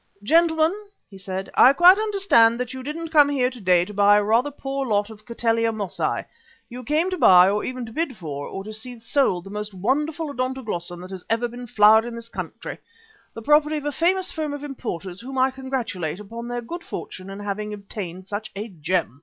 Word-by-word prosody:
"Gentlemen," 320 - +3 0.4
he 195 - -12
said, 190 0 -5
"I 260 - +7
quite 360 +6 +7
understand 390 - +3
that 250 0 -3
you 260 - -6
didn't 315 +5 -5
come 295 -3 +5
here 260 -3 +1
to 245 -2 -11
day 180 -2 +3
to 210 - -10
buy 205 +1 +5
a 210 - +2
rather 230 +7 +2
poor 275 -1 -4
lot 205 -1 0
of 215 -1 -15
Cattleya 230 -1 +1
Mossiæ. 205 -4 -2 0.4
You 250 +1 -8
came 310 +9 0
to 370 - -3
buy, 180 -6 +7
or 205 +2 0
to 255 -3 -5
bid 310 -5 -2
for, 145 -4 -6
or 195 - -6
to 215 +2 -8
see 240 +3 -8
sold 225 - +1
the 195 - -11
most 210 -1 -5
wonderful 290 - -1
Odontoglossum 220 -10 -4
that 185 - -10
has 190 -2 -7
ever 230 +2 +1
been 245 +1 -9
flowered 220 +1 +5
in 240 -1 -6
this 230 0 -7
country, - - -7 0.6
the 225 - -8
property 300 +3 +3
of 295 - -6
a 295 - 0
famous 365 +5 +1
firm 310 -2 -3
of 290 - -8
importers 195 - -6
whom 265 +2 -7
I 260 +1 +3
congratulate 245 - -4
upon 230 +3 -8
their 245 0 -3
good 340 +8 -7
fortune 185 +1 -8
in 195 +1 -8
having 205 +1 -4
obtained 195 -3 -7
such 210 +2 -5
a 210 +3 -5
gem. 165 - -2
230 Hz, 210 wpm, -23 LUFS, 200-275 Hz, 0.6 s, I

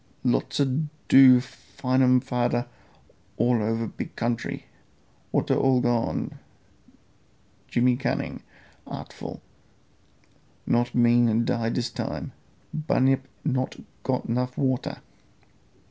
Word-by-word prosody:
Lots 125 +2 0
a 140 - +4 0.4
do 130 -2 +9
find 130 0 -2
um 125 -1 +5
fader 125 -2 0 0.7
all 120 -2 +2
over 115 +2 0
big - - -7
country. 115 0 -2 0.7
Water - - +1
all 130 -1 +3
gone, 120 -2 -1 1.3
Jimmy 125 0 +2
cunning 130 - -2 0.5
artful, - - -8 1.2
not 120 0 +1
mean 120 -1 +4
die 115 -1 0
dis 120 +1 -2
time. - - -4 0.4
Bunyip 135 -4 +1 0.2
not 130 -3 -1 0.3
got 130 -1 -1
'nuff 125 +2 -1
water. 130 -2 -1
125 Hz, 100 wpm, -26 LUFS, 120-130 Hz, 1.3 s, do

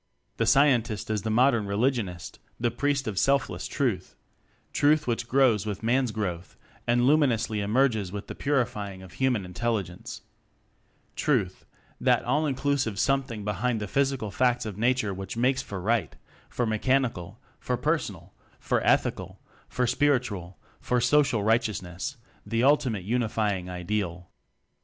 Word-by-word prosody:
The - - +1
Scientist 120 -7 +3
is 105 -2 0
the 110 - -3
modern 120 -1 +3
re 100 - -2
ligionist, 105 -7 -1 0.2
the 120 0 +1
priest 140 +2 -1
of 100 -3 -1
selfless 140 0 +1
Truth: 115 -11 -2 0.6
Truth 150 +1 +3
which 120 -1 -2
grows 120 -6 +3
with 105 0 -4
Man's 125 +2 +2
growth 95 -6 -4 0.3
and 120 +1 +3
luminously 130 -7 +2
emerges 110 -2 +1
with 100 0 -6
the - - -7
purifying 105 -9 -2
of 95 - -12
human 125 -7 0
Intelligence: 95 -1 -4 0.9
Truth - - 0 0.3
that - - +3
all 155 +1 +1
inclusive 135 -5 0
Something 130 -4 0
behind 110 +3 -1
the 105 - -4
physical 135 -3 0
facts 125 0 +1
of 105 -3 -5
nature 115 -1 +1
which 95 +3 -6
makes 130 +3 +2
for 100 - -6
Right 110 +4 0 0.3
for 120 - -1
mechan 130 +4 +2
ical, 90 -3 -9 0.2
for 125 - -2
personal, 105 - -2 0.3
for - - 0
ethical, - - +1 0.3
for 125 - 0
spiritual, 115 - 0 0.2
for 125 - 0
social 125 -3 +3
righteousness 110 - -1 0.3
the 115 +1 -1
ultimate 130 -8 +2
Unifying 105 -4 -1
Ideal. 90 -1 -3
115 Hz, 140 wpm, -27 LUFS, 100-130 Hz, 0.9 s, Scientist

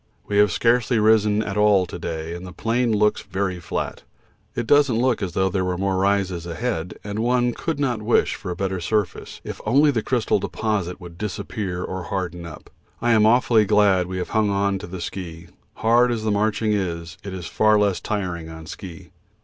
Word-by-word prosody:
We 100 0 +1
have 105 -2 +5
scarcely 120 +3 +2
risen 110 -1 +3
at 100 -1 -4
all 105 -3 +4
to 90 - -8
day, 80 0 -4
and 85 +1 -7
the 90 - -8
plain 115 +5 0
looks 105 0 +2
very 95 -2 -3
flat. 85 - -4 0.5
It - - -2
doesn't 140 -2 +4
look 125 -1 +1
as 95 -3 -3
though 95 0 +2
there 95 0 0
were 90 -1 -1
more 95 0 0
rises 95 -3 0
ahead, 90 -2 -3
and 105 +1 -4
one 120 +1 +2
could 160 +2 -3
not 125 -6 0
wish 110 +3 +2
for 95 - -7
a 90 - -3
better 95 0 -2
surface 105 +3 -2
if - - -7
only 145 +3 +4
the 115 -5 0
crystal 120 0 +1
deposit 100 -5 -2
would 85 -2 -11
disappear 100 -3 -4
or 95 -2 -5
harden 90 -3 -4
up. 75 -2 -12 0.3
I 120 0 +1
am 110 -1 +5
awfully 115 -1 +4
glad 100 -3 +3
we 95 0 -4
have 90 - -3
hung 110 -1 +2
on 100 0 0
to 105 - -8
the 90 0 -7
ski; 85 -1 -7 0.3
hard 120 +2 +3
as 115 -2 -2
the 110 - +1
marching 105 +1 +1
is, 85 -3 -3
it 100 - -6
is 90 -2 -6
far 110 +3 +3
less 100 -4 +2
tiring 90 -6 -3
on 80 0 -9
ski. 90 0 -9
100 Hz, 205 wpm, -23 LUFS, 90-110 Hz, 0.5 s, have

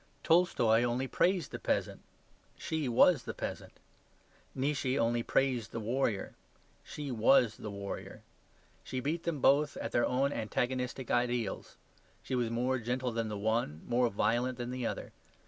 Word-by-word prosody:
Tolstoy 125 -10 +4
only 120 +2 0
praised 180 +5 +1
the - - -5
peasant; - - -1 0.6
she 155 -5 -2
was 135 +5 +5
the - - -6
peasant. - - -6 0.8
Nietzsche 135 -1 0
only 120 -2 +1
praised 125 -3 0
the 115 - -4
warrior; 115 -2 -1 0.5
she 145 -2 -6
was 115 -1 +4
the 105 - -6
warrior. 100 -1 -7 0.6
She 130 - -4
beat 155 +6 -2
them 160 -5 -2
both 145 +2 +4
at - - -4
their 120 - +2
own 135 +3 +1
antagonistic 125 +3 -2
ideals; 120 -3 -1 0.5
she - - -5
was 120 -2 +1
more 125 +3 0
gentle 125 +2 -2
than 115 -1 -2
the 105 - -4
one, 105 -7 -1
more 120 0 +2
violent 120 +4 0
than 120 0 -4
the 125 -2 -2
other. - - -5
125 Hz, 150 wpm, -32 LUFS, 115-135 Hz, 0.8 s, was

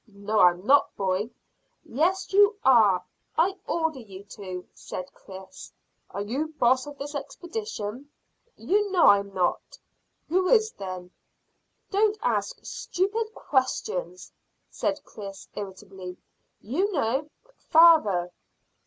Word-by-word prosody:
"No, 210 +1 -2
I'm 180 +1 +4
not, 285 +4 +4
boy." 195 +2 -1 0.5
"Yes, 360 +10 0
you 410 +1 +5
are. 210 -8 +5 0.3
I 365 +4 +3
order 320 -4 -1
you 200 -4 -11
to," 185 -3 -7
said 185 0 -8
Chris. 190 0 -12 0.4
"Are 200 - -4
you 295 +9 -3
boss 255 +3 +3
of 290 -1 -9
this 290 +2 -6
expedition?" 290 - -6 0.5
"You 410 +2 +1
know 360 -3 +4
I'm 200 0 +5
not." 180 -2 -1 0.5
"Who 370 +3 +1
is, 440 -1 +4
then?" 185 -2 -7 0.8
"Don't 420 +1 +2
ask - - 0
stupid 435 +5 -2
questions," 365 - -2 0.4
said 295 - -1
Chris 195 -2 -10
irritably. 190 -2 -8 0.4
"You 360 - -1
know: 280 - 0 0.4
father." 220 - +6
260 Hz, 115 wpm, -26 LUFS, -, 0.8 s, father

